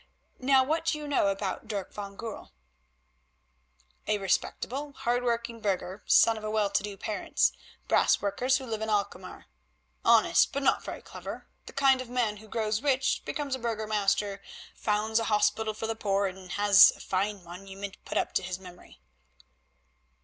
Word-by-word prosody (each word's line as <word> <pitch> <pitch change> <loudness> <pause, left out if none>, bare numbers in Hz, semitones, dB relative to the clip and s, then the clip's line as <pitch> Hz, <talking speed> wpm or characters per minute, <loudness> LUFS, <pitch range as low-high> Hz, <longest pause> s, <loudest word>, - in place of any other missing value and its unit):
Now 265 0 +4
what 320 +5 -1
do 330 - +1
you 300 -1 -7
know 285 -8 +2
about 195 0 -3
Dirk 200 -4 -4
van 200 -1 -7
Goorl?" 225 -2 -8 1.5
"A 215 - +2
respectable, 260 +8 -2
hard 245 -1 -1
working 235 -1 -2
burgher, 195 -2 -2
son 225 -1 +5
of 215 - -8
well 210 -2 +1
to - - +2
do 205 -1 -6
parents, 210 +2 0 0.4
brass - - +4
workers 245 +6 +1
who 265 - -7
live 220 -3 -4
at 220 - -2
Alkmaar. 205 -2 -3 0.6
Honest, - - +5
but 280 - -2
not - - +2
very - - -7
clever; - - -8 0.2
the - - -10
kind 270 -2 +4
of 255 - -9
man 240 -4 0
who 215 +1 -14
grows 215 0 -1
rich, 265 -2 +1
becomes 285 -3 -3
a 260 - -2
Burgomaster, 210 -3 -1 0.3
founds 220 +1 0
a 225 - -2
hospital 215 0 +1
for 225 - -4
the 225 0 -2
poor, 200 -2 0
and 185 -1 -6
has 205 -1 +7
a - - -16
fine 195 +1 -2
monument 195 +3 -9
put - - -4
up - - -1
to - - +1
his 180 -1 -4
memory." 180 - -14
215 Hz, 170 wpm, -28 LUFS, 200-240 Hz, 1.5 s, has